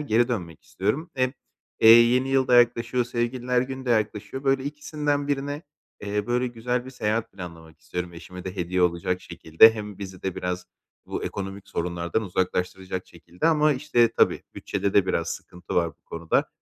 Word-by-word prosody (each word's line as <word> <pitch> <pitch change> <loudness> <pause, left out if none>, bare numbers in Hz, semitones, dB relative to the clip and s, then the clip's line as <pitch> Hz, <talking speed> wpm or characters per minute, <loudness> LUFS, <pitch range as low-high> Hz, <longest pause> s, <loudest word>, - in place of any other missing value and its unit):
geri 120 -4 +2
dönmek 85 -10 -4
istiyorum. 135 - -2
Hem, 130 0 +1 0.5
eee, 110 - +7
yeni 120 +3 +7
yıl 135 -1 +2
da 125 - +5
yaklaşıyor, 120 0 +3
Sevgililer 125 +1 0
Günü 130 0 -6
de - - +1
yaklaşıyor. 110 +4 -1
Böyle 135 0 +2
ikisinden 145 0 -2
birine, 145 +2 -2 0.4
eee, 105 0 -2
böyle 125 +1 +1
güzel 120 +1 -2
bir 130 - -9
seyahat 110 -3 -2
planlamak 85 -4 -10
istiyorum 90 0 -5
eşime 90 +2 -10
de 95 +1 -6
hediye 90 0 0
olacak 90 +1 +1
şekilde. 85 +8 +5
Hem 105 -2 -7
bizi 95 -2 -8
de 95 -2 -2
biraz 90 0 -3 0.4
bu - - -4
ekonomik 100 0 -5
sorunlardan 85 +4 -2
uzaklaştıracak 95 -1 -2
şekilde 90 - -5
ama, 155 -2 +4
işte, 125 -4 +3
tabii - - +2
bütçede 100 -1 -2
de 100 -2 +5
biraz 85 -3 0
sıkıntı 90 +1 -7
var 85 -1 +3
bu 75 - -27
konuda. 85 -1 0
110 Hz, 170 wpm, -25 LUFS, 90-125 Hz, 0.5 s, eee